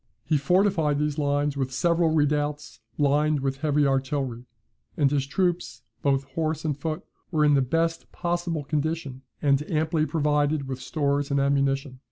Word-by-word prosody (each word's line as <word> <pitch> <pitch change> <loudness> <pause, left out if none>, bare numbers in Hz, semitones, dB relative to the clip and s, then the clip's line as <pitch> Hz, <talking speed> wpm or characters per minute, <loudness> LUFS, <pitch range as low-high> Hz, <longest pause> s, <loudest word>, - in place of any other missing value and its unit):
He 155 - +1
fortified 165 -1 +2
these 150 0 -1
lines 145 0 +1
with 135 -2 -2
several 170 +4 +2
redoubts, 145 -5 0 0.2
lined 145 +1 +2
with 135 0 -1
heavy 150 0 +2
artillery; 135 -3 -1 0.5
and 140 -3 +3
his 140 -2 0
troops, 175 -4 -1 0.2
both 135 -1 +2
horse 160 +1 -2
and 150 -3 0
foot, 155 +4 -4 0.3
were 155 -3 +2
in 145 - +5
the 140 - +4
best 165 +5 -1
possible 175 -3 -2
condition, 150 -2 -2 0.2
and 140 -1 +3
amply 155 0 +1
provided 150 -2 +1
with 130 -1 -5
stores 145 -2 -1
and 140 0 +1
ammunition. 140 -1 0
145 Hz, 155 wpm, -26 LUFS, 140-155 Hz, 0.5 s, in